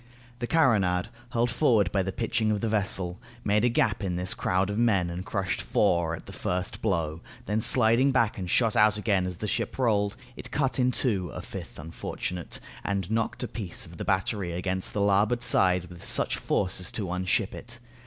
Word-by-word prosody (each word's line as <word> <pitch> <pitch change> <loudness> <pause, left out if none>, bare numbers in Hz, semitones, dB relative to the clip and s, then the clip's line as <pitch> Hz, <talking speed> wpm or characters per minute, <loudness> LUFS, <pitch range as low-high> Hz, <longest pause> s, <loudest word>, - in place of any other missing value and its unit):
The 120 - -2
carronade, 100 - +3 0.2
hurled 120 0 +1
forward 115 - +3
by 95 - +2
the 95 +1 -2
pitching 110 +3 0
of 105 -1 +1
the 115 - 0
vessel, 100 -3 -1 0.2
made 105 +1 +2
a 125 - +4
gap 110 -3 +1
in 90 -3 -1
this 90 +1 +1
crowd 95 +2 0
of 105 - -3
men 100 -7 +2
and 90 +2 -5
crushed 95 -2 -2
four 85 -2 +2
at - - -12
the - - -10
first 90 0 -3
blow; 85 -6 -1 0.2
then 105 +2 0
sliding 120 +3 +4
back 115 -5 +1
and 90 -2 -4
shot 115 +1 +3
out 105 0 +5
again 100 -4 +1
as 90 -2 -5
the 105 - -4
ship - - -2
rolled, 105 -5 +1 0.2
it - - -8
cut 135 -2 0
in 125 0 +3
two 100 -9 +1
a - - -6
fifth - - -8
unfortunate, 80 +2 -5 0.2
and 100 -1 -2
knocked 115 0 -1
a - - -2
piece 100 -7 -5
of 85 +1 -12
the - - -4
battery 95 -2 0
against 95 +1 -2
the 105 - -1
larboard 105 +4 +2
side 90 -1 +3
with 85 -1 -12
such - - -1
force 95 -1 -1
as 90 - -4
to 100 -5 -2
unship 95 +3 0
it. 115 +1 -9
100 Hz, 205 wpm, -27 LUFS, 90-110 Hz, 0.2 s, out